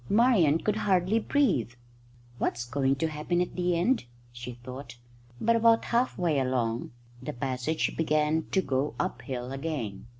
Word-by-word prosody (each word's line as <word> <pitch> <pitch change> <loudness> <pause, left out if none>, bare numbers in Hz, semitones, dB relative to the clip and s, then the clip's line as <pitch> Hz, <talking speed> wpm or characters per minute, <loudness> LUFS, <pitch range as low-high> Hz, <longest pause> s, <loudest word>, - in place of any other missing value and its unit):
Marian 205 - +4
could 210 +5 -1
hardly 195 +1 +2
breathe. 215 - +1 0.7
"What's 120 +1 -1
going 135 +2 +1
to 160 +4 0
happen 155 +3 -1
at 180 - -1
the 180 -1 +1
end?" 230 - +1 0.3
she 120 +1 -7
thought. 130 0 -8 0.4
But 230 +1 +3
about 230 0 +4
half 240 +2 +1
way 165 -5 +1
along 125 -3 -1 0.3
the - - -5
passage 130 +5 -1
began 155 0 +1
to 190 - +1
go 135 +1 -1
uphill 130 -8 -3
again. 135 -9 -4
155 Hz, 145 wpm, -28 LUFS, 130-185 Hz, 0.7 s, Marian